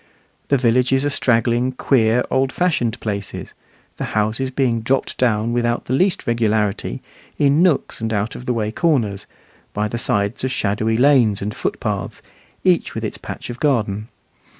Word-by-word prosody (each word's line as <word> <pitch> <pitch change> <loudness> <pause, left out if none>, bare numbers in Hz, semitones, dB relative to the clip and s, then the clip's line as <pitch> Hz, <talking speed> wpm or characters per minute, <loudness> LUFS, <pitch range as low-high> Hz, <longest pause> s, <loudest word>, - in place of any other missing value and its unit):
The 140 - +3
villages 125 +2 +2
are 145 - 0
straggling, 120 0 +1
queer, 125 -2 +2
old 130 0 +1
fashioned 140 -11 0
places, 100 -2 -5 0.4
the - - -4
houses 110 +5 +1
being 125 -3 0
dropped 130 +4 0
down 115 -2 +1
without 120 0 0
the 130 - -2
least 185 +7 +1
regularity, 110 -4 0 0.3
in 145 +2 +3
nooks 175 -9 +1
and 110 0 -2
out 105 +1 -1
of 125 - -9
the 125 - +1
way 110 -2 -1
corners, 115 - 0 0.5
by 105 +1 0
the 120 +3 -4
sides 100 0 0
of 130 - 0
shadowy 110 -1 0
lanes 125 -6 +4
and 105 +1 -4
footpaths, - - -3 0.4
each 180 -2 +2
with - - -4
its - - -5
patch - - -7
of 120 - -9
garden. 110 -7 0
120 Hz, 160 wpm, -20 LUFS, 110-130 Hz, 0.5 s, lanes